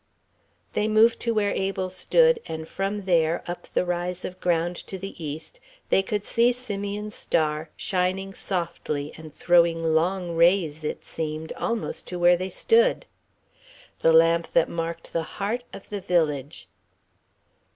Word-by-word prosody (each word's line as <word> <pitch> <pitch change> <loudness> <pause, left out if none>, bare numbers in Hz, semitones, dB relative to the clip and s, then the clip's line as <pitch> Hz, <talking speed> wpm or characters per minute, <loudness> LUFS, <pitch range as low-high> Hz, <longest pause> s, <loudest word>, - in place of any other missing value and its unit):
They 210 - +1
moved 220 +2 +4
to 235 - -1
where 210 -2 +1
Abel 190 -1 -2
stood, 485 - +3
and 160 0 -5
from 195 +2 -3
there, 170 -2 +2
up 175 0 -6
the - - 0
rise 175 +1 -2
of 185 0 -7
ground 175 0 +1
to 190 - -5
the 190 -2 -8
east, 155 - -6 0.3
they - - +4
could 205 +1 -2
see 235 +1 +3
Simeon's 210 -3 -4
star, 155 -1 -1
shining 190 +1 -1
softly 170 -6 -3
and 160 -1 -10
throwing 170 0 +3
long 175 +1 0
rays, 165 -2 +3
it 150 - -4
seemed, 155 0 -4
almost 230 -2 -3
to 180 - -5
where 175 0 +5
they 185 +2 -3
stood: 465 - +3 0.9
the 165 - +4
lamp 165 +1 +4
that 170 - +4
marked 165 0 -5
the 165 - +1 0.2
heart 220 +5 -1
of 195 - -10
the 205 -1 -4
village. 150 - -1
180 Hz, 150 wpm, -25 LUFS, 165-200 Hz, 0.9 s, where